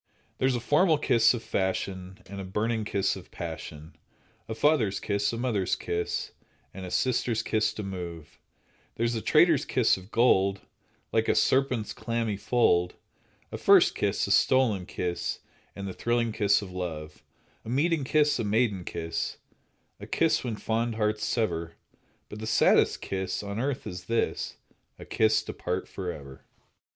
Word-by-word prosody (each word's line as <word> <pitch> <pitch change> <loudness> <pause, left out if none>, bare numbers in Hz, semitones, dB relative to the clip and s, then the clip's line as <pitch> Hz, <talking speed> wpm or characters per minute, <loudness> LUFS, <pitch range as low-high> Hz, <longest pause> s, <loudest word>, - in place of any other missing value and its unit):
There's 130 -1 +2
a - - -1
formal 155 +7 +3
kiss 115 -5 +4
of 115 - -6
fashion, 95 -1 -3
And 100 0 -7
a - - -5
burning 110 +4 -1
kiss 100 -2 0
of - - -11
passion, 75 +1 -8 0.5
A 110 - -3
father's 110 -6 +2
kiss, 100 0 0
A 115 - -4
mother's 115 -6 0
kiss, 85 0 -3 0.4
And 95 -1 -7
a - - -6
sister's 120 0 0
kiss 110 -1 +1
to 105 - -5
move; 85 -5 -7 0.6
There's 115 +1 0
a 115 - -2
traitor's - - +4
kiss - - +2
of 95 +1 -12
gold, 100 -5 +3 0.5
Like 110 0 +1
a - - +3
serpent's 130 -5 +1
clammy 115 -1 -2
fold, 100 -4 +2 0.6
A - - -5
first - - +6
kiss, - - 0
A - - -3
stolen 110 -9 +3
kiss, 90 -1 -3 0.3
And 100 0 -5
the 95 - -5
thrilling 120 +1 0
kiss 105 -2 +2
of 95 - -9
love; 80 -4 -6 0.4
A - - -8
meeting 150 +4 +1
kiss, 150 +1 +2
A - - 0
maiden 105 -3 +1
kiss, 80 -1 -4 0.6
A - - -9
kiss 165 -1 +2
when 120 -4 -3
fond 115 +2 -1
hearts 105 -1 0
sever, 85 -9 -1 0.5
But 105 - -9
the 110 - -5
saddest 110 - +3
kiss 95 +1 -3
On 100 +1 -4
earth 135 +1 -2
is 90 0 -7
this— 115 +3 -1 0.4
A - - -10
kiss 110 0 +2
to - - -6
part 90 +1 -3
forever. 75 -8 -7
105 Hz, 160 wpm, -28 LUFS, 95-115 Hz, 0.6 s, first